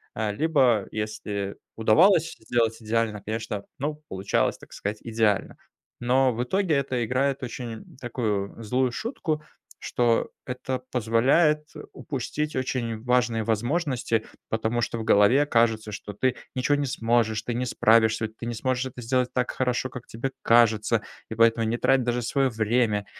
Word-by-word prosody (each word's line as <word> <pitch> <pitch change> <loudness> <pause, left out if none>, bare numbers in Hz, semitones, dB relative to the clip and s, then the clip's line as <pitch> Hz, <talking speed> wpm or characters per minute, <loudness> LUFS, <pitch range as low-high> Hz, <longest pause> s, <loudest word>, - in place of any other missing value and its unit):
э, 110 -1 -1
либо 130 -7 +2
если 105 -2 -4 0.2
удавалось 165 - +4
сделать 115 0 0
идеально, 110 -1 -1
конечно, 110 -2 -4
ну, 150 +2 -3
получалось, 95 +1 0
так - - -15
сказать, 105 +1 -4
идеально. 110 -3 0 0.4
Но 130 +1 +3
в 120 +2 -1
итоге- 185 +4 0
это 130 -4 0
играет 135 +3 0
очень, 120 -2 -7
такую, 110 -5 -2
злую 125 +3 +1
шутку, 160 - -3 0.4
что 120 -2 +1 0.2
это 130 0 -3
позволяет 135 +7 +3 0.3
упустить 150 +2 -4
очень 120 -4 -2
важные 125 -3 +2
возможности, 120 0 0 0.2
потому 110 +2 0
что 115 - -2
в 110 - -4
голове 110 +7 +5
кажется, 115 -4 +1
что 105 0 -7
ты 125 +4 0 0.2
ничего 130 +3 +1
не 145 -1 -1
сможешь, 115 -4 +1
ты 120 - -3
не 125 +2 -1
справишься, 110 0 +3
у - - -2
ты 115 +2 -8
не 120 - -3
сможешь 130 +2 -1
это 125 -1 -9
сделать 125 +1 +1
так 125 -1 0
хорошо, 130 0 -1
как 125 -1 -9
тебе 125 +4 -4
кажется 115 -1 +3 0.3
и 110 - -5
поэтому 115 0 +3
не 115 +2 0
трать 135 +1 +3
даже 120 0 -1
свое 135 +2 +1
время. 110 -2 +1
120 Hz, 155 wpm, -26 LUFS, 110-130 Hz, 0.4 s, голове